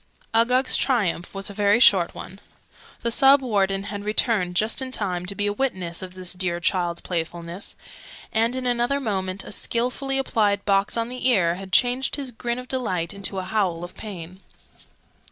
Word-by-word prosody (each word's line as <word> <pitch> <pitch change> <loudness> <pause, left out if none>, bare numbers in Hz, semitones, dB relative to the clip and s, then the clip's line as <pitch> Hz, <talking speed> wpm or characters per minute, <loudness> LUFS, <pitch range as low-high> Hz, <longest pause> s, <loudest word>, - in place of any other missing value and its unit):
Uggug's 250 +3 +3
triumph 200 -9 0
was 195 +1 -4
a - - -9
very 205 +2 +3
short 190 -8 +5
one: 190 +2 -9 0.6
the 235 - 0
Sub 270 +3 +6
Warden 195 -6 0
had 205 0 -6
returned, 210 -4 +1
just 215 +7 +2
in 260 -1 -4
time 180 -6 -1
to 200 - -3
be 205 - -1
a 205 - 0
witness 185 -9 -2
of 185 -1 -7
his 185 0 -4
dear 180 -2 -1
child's 175 -1 0
playfulness, 170 +2 -4 0.6
and 230 +3 +2
in 260 -1 -3
another 245 +3 +1
moment 190 -6 -2
a - - -9
skilfully 250 +5 -1
applied 210 -6 +1
box 200 +2 +2
on 230 0 -1
the 255 +1 -1
ear 185 -9 +3
had 190 +1 -8
changed 250 +4 +3
the 275 -3 -4
grin 235 +1 -3
of 250 0 -7
delight 185 -11 -2
into 200 0 -3
a 190 - -2
howl 185 -4 -1
of 175 - -7
pain. 185 -3 -8
205 Hz, 180 wpm, -24 LUFS, 185-240 Hz, 0.6 s, Sub